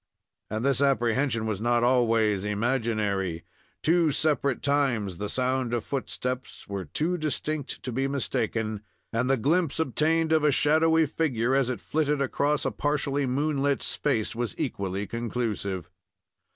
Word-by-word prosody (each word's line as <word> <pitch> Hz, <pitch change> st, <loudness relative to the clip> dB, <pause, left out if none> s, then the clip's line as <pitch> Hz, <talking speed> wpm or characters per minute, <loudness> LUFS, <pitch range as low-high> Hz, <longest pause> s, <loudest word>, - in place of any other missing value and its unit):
And 110 Hz, +4 st, -2 dB
this 140 Hz, -1 st, +3 dB
apprehension 125 Hz, -3 st, +2 dB
was 110 Hz, -2 st, -2 dB
not 120 Hz, 0 st, +2 dB
always 115 Hz, -5 st, +3 dB
imaginary. 105 Hz, -5 st, -1 dB, 0.4 s
Two 165 Hz, 0 st, +4 dB
separate 140 Hz, -3 st, +1 dB
times 120 Hz, -10 st, +1 dB
the 105 Hz, 0 st, -3 dB
sound 130 Hz, -1 st, 0 dB
of 115 Hz, -, -3 dB
footsteps 130 Hz, -1 st, -4 dB
were 100 Hz, -2 st, -4 dB
too 165 Hz, -, -1 dB
distinct 155 Hz, -1 st, -3 dB
to 130 Hz, -, -4 dB
be 135 Hz, +3 st, 0 dB
mistaken, 115 Hz, -5 st, -2 dB, 0.3 s
and 120 Hz, +3 st, +1 dB
the 135 Hz, -, +3 dB
glimpse 160 Hz, +6 st, +1 dB
obtained 160 Hz, +2 st, +1 dB
of 160 Hz, -1 st, +3 dB
a 150 Hz, -, +5 dB
shadowy 160 Hz, +3 st, +4 dB
figure, 135 Hz, -5 st, 0 dB
as 135 Hz, -2 st, +2 dB
it 125 Hz, -, -2 dB
flitted 150 Hz, -2 st, 0 dB
across 145 Hz, +2 st, 0 dB
a -, -, +1 dB
partially 145 Hz, -1 st, 0 dB
moonlit 140 Hz, +1 st, 0 dB
space, 115 Hz, -7 st, 0 dB
was 120 Hz, -3 st, -3 dB
equally 100 Hz, +1 st, -2 dB
conclusive. 105 Hz, -5 st, -3 dB
130 Hz, 140 wpm, -27 LUFS, 110-145 Hz, 0.4 s, a